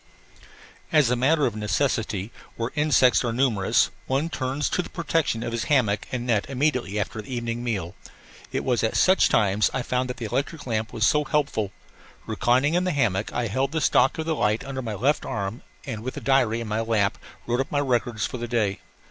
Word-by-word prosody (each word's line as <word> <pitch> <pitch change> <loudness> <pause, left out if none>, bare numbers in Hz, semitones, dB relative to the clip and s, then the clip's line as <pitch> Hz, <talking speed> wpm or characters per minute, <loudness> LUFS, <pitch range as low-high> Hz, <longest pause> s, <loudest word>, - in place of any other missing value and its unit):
As 150 -6 +4
a - - +3
matter 140 +4 +3
of 115 - -1
necessity, 110 -2 -1 0.2
where 115 +1 -3
insects 150 -4 +4
are 120 - 0
numerous 115 -5 +2 0.2
one 140 +5 0
turns 140 -3 -2
to - - 0
the - - -9
protection 165 -9 -1
of 115 - -3
his 115 -1 -2
hammock 115 -9 +1
and 120 -1 -3
net 115 -4 +1
immediately 130 -6 0
after 110 +2 -3
the 110 - -12
evening 120 -1 -3
meal. 95 -8 -2 0.6
It - - -2
was 125 -2 +1
at 110 - +1
such 185 +1 +5
times 105 -1 +3
that - - -3
I - - -1
found 125 +1 -1
the 120 -2 -5
electric 140 +7 -3
lamp 110 -3 -1
so 150 +6 +4
helpful. 140 -9 0 0.5
Reclining 130 +6 +2
in 175 +1 +2
the 185 - 0
hammock, 110 -8 0
I 120 - -1
held 130 +7 -1
the 160 - +1
stock 135 -2 +3
of 160 - -3
the 160 - 0
light 110 -7 0
under 135 -1 -4
my 110 -4 -4
left 135 +9 +1
arm 100 +2 -4 0.2
and 115 -6 -5
with 130 +3 -6
diary 125 -4 +2
in 115 - -5
my 105 +1 -1
lap 110 -3 +1 0.3
wrote 120 +1 0
up 135 - -2
my 145 - +1
records 120 -5 0
for 125 - -5
the 120 - -4
day. 110 -5 0
120 Hz, 205 wpm, -25 LUFS, 110-140 Hz, 0.6 s, such